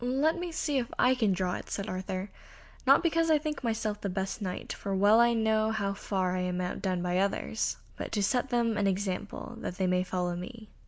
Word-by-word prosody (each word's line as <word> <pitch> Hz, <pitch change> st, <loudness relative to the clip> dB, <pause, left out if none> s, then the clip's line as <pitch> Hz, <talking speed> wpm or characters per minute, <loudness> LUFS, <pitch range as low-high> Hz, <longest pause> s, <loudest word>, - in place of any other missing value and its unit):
"Let 275 Hz, +6 st, +2 dB
me 350 Hz, -1 st, -3 dB
see 295 Hz, -3 st, 0 dB
if 240 Hz, -, -2 dB
I 250 Hz, -, +5 dB
can 225 Hz, -6 st, +2 dB
draw 180 Hz, -1 st, 0 dB
it," -, -, -10 dB
said 200 Hz, +1 st, -3 dB
Arthur, 185 Hz, 0 st, -4 dB, 0.6 s
"not -, -, +7 dB
because 330 Hz, -1 st, +2 dB
I 310 Hz, -, +6 dB
think 300 Hz, -2 st, -4 dB
myself 220 Hz, -2 st, -1 dB
the 200 Hz, -, -2 dB
best 190 Hz, +3 st, -3 dB
Knight, 185 Hz, -2 st, -4 dB
for 195 Hz, -1 st, -3 dB
well 205 Hz, +4 st, +6 dB
I 235 Hz, 0 st, +5 dB
know 220 Hz, -1 st, +2 dB
how 200 Hz, -3 st, -1 dB
far 190 Hz, -2 st, -1 dB
I -, -, -1 dB
am 180 Hz, 0 st, -1 dB
outdone 180 Hz, 0 st, -2 dB
by 180 Hz, 0 st, +1 dB
others, 200 Hz, +3 st, 0 dB, 0.2 s
but -, -, -5 dB
to 205 Hz, -2 st, +1 dB
set 250 Hz, +5 st, +1 dB
them 235 Hz, -3 st, +1 dB
an 205 Hz, -, +2 dB
example 195 Hz, +4 st, -3 dB
that 180 Hz, -, -5 dB
they 190 Hz, -, +1 dB
may 180 Hz, 0 st, +2 dB
follow 180 Hz, -1 st, -1 dB
me." 215 Hz, +5 st, -8 dB
205 Hz, 220 wpm, -30 LUFS, 185-235 Hz, 0.6 s, not